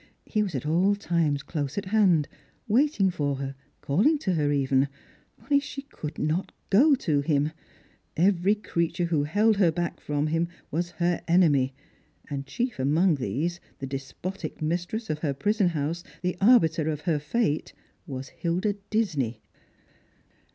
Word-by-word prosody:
He 215 - 0
was 195 -7 -2
at 130 - -3
all 180 +6 +3
times 165 -7 0
close 145 -1 -4
at 200 - -2
hand, 185 -7 +3 0.4
waiting 225 -4 +3
for 145 -5 -1
her, 135 0 -4 0.3
calling 210 - +3
to 190 -10 -1
her 150 -3 +1
even, 135 -1 +2 0.6
only 285 0 +3
she 280 -1 -7
could 155 - -8
not 155 +5 -1 0.2
go 275 +9 +6
to 155 - 0
him. 145 0 +1 0.7
Every 190 +3 +3
creature 175 -4 -1
who 160 -4 +1
held 210 +7 +3
her 180 -5 +4
back 170 +1 -3
from_ 150 +1 -1
him 165 +2 +1 0.2
was 175 +3 -1
her 175 0 +1
enemy; 145 -7 +3 0.6
and 140 -1 -4
chief 245 - -2
among 155 +5 +3
these, 145 - -2 0.2
the 135 - -5
despotic 140 +8 -6
mistress 175 +8 -2
of 150 - -3
her 145 -3 -1
prison 205 - +2
house, 165 +1 -2 0.2
the 180 0 0
arbiter 165 -9 +5
of 150 -2 -3
her 160 -4 0
fate, 150 +1 -1 0.4
was 135 -2 -6
Hilda 180 +4 -1 0.2
Disney. 155 - 0
170 Hz, 150 wpm, -27 LUFS, 145-200 Hz, 0.7 s, go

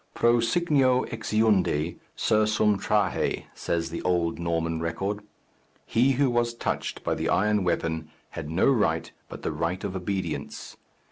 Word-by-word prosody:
Pro 120 0 +4
signo 130 -1 +2
exeundi, 105 -8 +1 0.2
sursum 105 -1 +2
trahe, 105 -1 +1
says 85 -1 -2
the 85 - -4
old 85 -2 0
Norman 85 -1 -1
record. 95 +5 -2 0.7
He 130 +4 +3
who 135 0 +2
was 120 0 +1
touched - - -3
by - - 0
the - - -2
iron 105 +2 +2
weapon 80 -2 -1 0.2
had 80 -3 -6
no 80 +4 +2
right 105 -12 +2 0.2
but - - -9
the - - -1
right 90 +3 -2
of 100 -2 -3
obedience. 95 -3 -4
100 Hz, 140 wpm, -26 LUFS, 85-115 Hz, 0.7 s, Pro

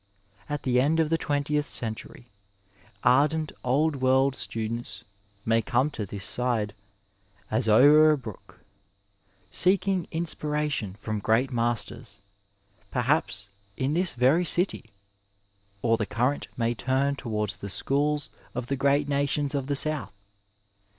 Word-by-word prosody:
At 145 -1 -3
the 125 -1 +3
end 155 +4 +2
of 160 -1 +1
the 165 - +3
twentieth 145 0 0
century, 110 +1 -3 0.8
ardent 150 +5 +3
old 145 +4 +1
world 130 +1 +3
students 115 +1 -3 0.4
may 115 0 +3
come 130 +6 +1
to 105 -7 -5
this 100 +1 -4
side 115 -4 0 0.4
" 100 0 -33
as 110 +1 +1
o'er 145 +8 +7
a 155 - +3
brook," 110 -7 -11 0.9
seeking 190 -1 +2
inspiration 150 - -2
from 110 0 -4
great 115 +6 +1
masters, 120 -2 -2 0.7
perhaps 125 -6 0 0.3
in 135 +3 0
this 175 -3 0
very 130 +8 +3
city; 175 - +2 0.9
or 115 -1 +3
the 105 -3 -2
current 125 +5 -1
may 115 0 +1
turn 130 +4 0
towards 105 -7 -3
the 100 - -7
schools 145 +8 0 0.3
of 125 0 -3
the 140 - -2
great 140 +2 +2
nations 140 0 0
of 140 -2 -2
the 145 - 0
south. 150 -6 -1
130 Hz, 130 wpm, -26 LUFS, 115-150 Hz, 0.9 s, o'er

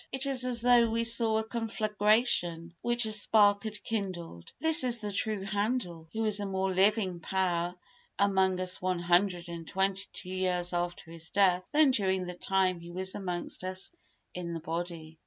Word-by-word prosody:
It 265 +1 0
is 270 -2 +1
as 240 -2 -1
though 240 -1 +5
we 230 +1 0
saw 230 -1 +3
a 220 - 0
conflagration 215 -6 +1
which 240 -1 +1
a 220 - -2
spark 205 -1 +3
had 210 -2 -5
kindled. 180 - -5
This 320 -1 +5
is 245 -2 +1
the 210 -2 -5
true 205 0 -1
Handel, 200 -5 -2
who 225 +3 -2
is 210 -1 +2
a 205 - -3
more 190 0 -1
living 190 -1 +2
power 175 -1 -1 0.4
among 190 -2 +2
us 185 0 -1
one 185 0 0
hundred 175 +1 +1
and 170 -1 -8
twenty 195 +1 -1
two 180 - -6
years 180 -1 -1
after 175 -1 -3
his 165 -1 -9
death 185 -2 +3
than 300 -2 +5
during 190 -5 +1
the 180 - -6
time 185 0 0
he 170 0 -11
was 185 +2 -3
amongst 180 -2 -4
us 185 +1 -3 0.4
in 170 -1 -5
the - - -4
body. 165 -1 -6
190 Hz, 180 wpm, -30 LUFS, 175-220 Hz, 0.4 s, though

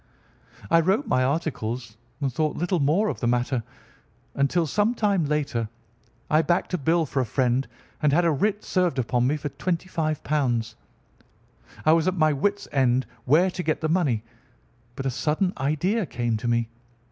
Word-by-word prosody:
"I 165 - +6
wrote 195 - +1
my 130 - +2
articles 125 -6 -2 0.3
and 135 -3 -1
thought 155 +3 -1
little 175 +1 0
more 160 +10 +2
of - - -3
the 120 - -1
matter 125 +1 +1 0.7
until, 150 +5 +1
some 210 - +1
time 200 -7 +1
later, 140 -7 -1 0.6
I 155 +1 +4
backed 175 +2 0
a 180 - +1
bill 160 +3 +2
for 140 -1 -2
a - - +3
friend 130 +2 +1 0.3
and 150 - +3
had 170 +4 +3
a 165 - +4
writ 205 +8 0
served 180 -7 0
upon 125 0 +1
me 150 +3 +1
for 145 0 -4
£ - - -28
25. 165 -4 -1 1.6
I 155 - +6
was 165 +1 +2
at 185 - +1
my 155 -2 +4
wit's 200 +8 -1
end 130 -2 +2 0.2
where 170 +8 +4
to 180 - -4
get 160 -3 -1
the 155 - 0
money, 145 -11 +1 0.7
but 135 - -5
a 135 - +1
sudden 155 +8 0
idea 160 - 0
came 120 -2 -1
to 120 - -4
me. 115 -1 +1
155 Hz, 175 wpm, -25 LUFS, 130-175 Hz, 1.6 s, I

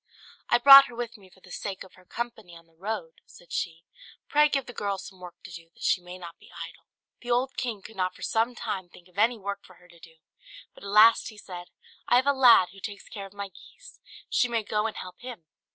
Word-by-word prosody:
"I - - +5
brought 275 +2 +11
her 245 - -12
with 240 0 -5
me 195 -4 -17
for 190 - -23
the 180 - -16
sake 195 0 -5
of 190 - -17
her 185 - -20
company 220 -6 -6
on 165 - -18
the 165 - -31
road," 180 -1 -6
said 175 - -15
she. 165 0 -3 0.4
"Pray 300 +1 +4
give 275 -3 -1
the 245 - -10
girl 200 -3 -2
some 190 0 -11
work 180 -1 -10
to 180 - -10
do, 170 0 -10
that - - -13
she 180 - +2
may 180 +1 -10
not 170 -2 -11
be - - -18
idle." - - -10 0.3
The 245 - -9
old 250 +2 +1
king 225 -6 -4
could 220 - -12
not 185 -1 -1
for - - -11
some 230 +2 0
time 195 -7 -4
think 175 0 -17
of 180 +2 -10
any 230 +3 +3
work 200 -1 -5
for 185 - -17
her 180 - -21
to 170 -1 -19
do, 165 0 -16 0.6
but - - -16
at 200 - -7
last 215 +4 +6
he 215 - -14
said, 180 -3 -9 0.4
"I - - +4
have 255 +2 +4
a 280 - +4
lad 245 -9 +6
who 195 +2 -15
takes 200 0 -8
care 200 -2 -7
of 195 - -20
my 200 -1 -6
geese; - - -16 0.3
she 245 - +2
may 230 -2 -1
go 210 +1 0
and 220 - -6
help 185 - -9
him." 245 -9 -9
200 Hz, 255 wpm, -27 LUFS, 180-235 Hz, 0.6 s, brought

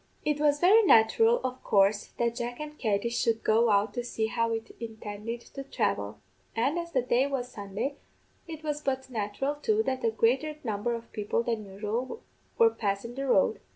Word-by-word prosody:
It 300 -1 +1
was 295 -1 +3
very 390 +7 +7
natural, 450 - +5
of 255 0 -4
coorse, 200 +1 +3
that 235 -1 +1
Jack 240 0 -4
and 300 0 -6
Katty 215 0 0
should 230 -1 0
go 225 +2 +4
out 205 +1 +2
to 245 - -3
see 225 -2 -2
how 230 0 0
it 225 0 -4
intended 225 0 -6
to 275 - -6
thravel; 155 - -2 0.4
and, 270 +9 +1
as 340 0 -6
the 255 -5 +1
day 250 +2 +2
was 260 -3 -3
Sunday, 210 +7 -4 0.5
it 315 -2 -8
was 295 -1 -2
but 265 -2 -2
natural, 220 +5 -2
too, 425 +9 +1
that 260 -10 -2
a 230 - +3
greater 255 +7 +1
number 225 +1 -1
of 230 0 -9
people 210 +2 -1
than 230 -2 -2
usual 210 - -4 0.3
were 460 -1 +6
passin' 205 - -2
the 275 +2 -4
road. - - +3
235 Hz, 190 wpm, -28 LUFS, 220-275 Hz, 0.5 s, very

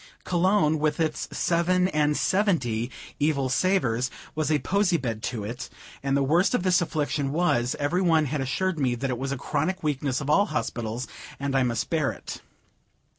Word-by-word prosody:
Cologne, 175 -3 +2
with 150 0 0
its 155 -2 -1
seven 180 +1 +2
and 150 -2 +1
seventy 130 - +1 0.3
evil 145 -3 +1
savors, 130 -6 +1 0.2
was 155 0 -1
a 150 - +4
posy 190 +2 +1
bed 115 -6 -3
to 115 -3 -3
it; 115 +5 -6 0.3
and 140 0 +1
the 140 - +2
worst 170 - +3
of 185 - 0
this 185 0 +3
affliction 145 -4 -1
was, 135 -7 +1
every 155 +5 0
one 165 -4 +3
had 145 0 -2
assured 165 +6 -1
me 125 -3 +1
that 130 +2 -2
it 120 - -3
was 135 +1 -3
a 140 - -2
chronic 160 +8 -2
weakness 140 -3 0
of 140 - -5
all 200 +7 +4
hospitals, 120 -5 -3 0.3
and 140 0 -2
I 135 - +4
must 120 -3 -1
bear 155 -5 +1
it. - - -8
150 Hz, 180 wpm, -26 LUFS, 130-175 Hz, 0.3 s, a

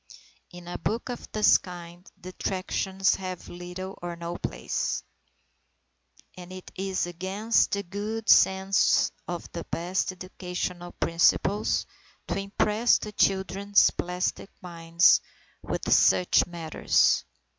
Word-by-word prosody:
In 175 -1 -12
a 175 - -5
book 230 +3 -2
of 245 - -7
this 215 -1 +5
kind, 175 0 -11
detractions 190 +1 -1
have 185 -2 -6
little 180 +2 -8
or 175 -1 -5
no 170 0 -6
place; - - -3 1.3
and 180 0 -11
it 185 0 -10
is 190 -1 -1
against 190 +6 0
the 200 0 -1
good 210 +4 -5
sense 190 +1 +4 0.2
of 175 -1 -5
the 170 - -5
best 180 +2 -2
educational 180 -1 -6
principles, 175 +5 +1 0.4
to - - -1
impress 210 +3 +2
the 210 - -7
children's 195 0 +2
plastic 180 +2 -3
minds 170 -1 +3 0.4
with - - -1
such 180 - +4
matters. 165 -3 +1
185 Hz, 115 wpm, -27 LUFS, 175-195 Hz, 1.3 s, this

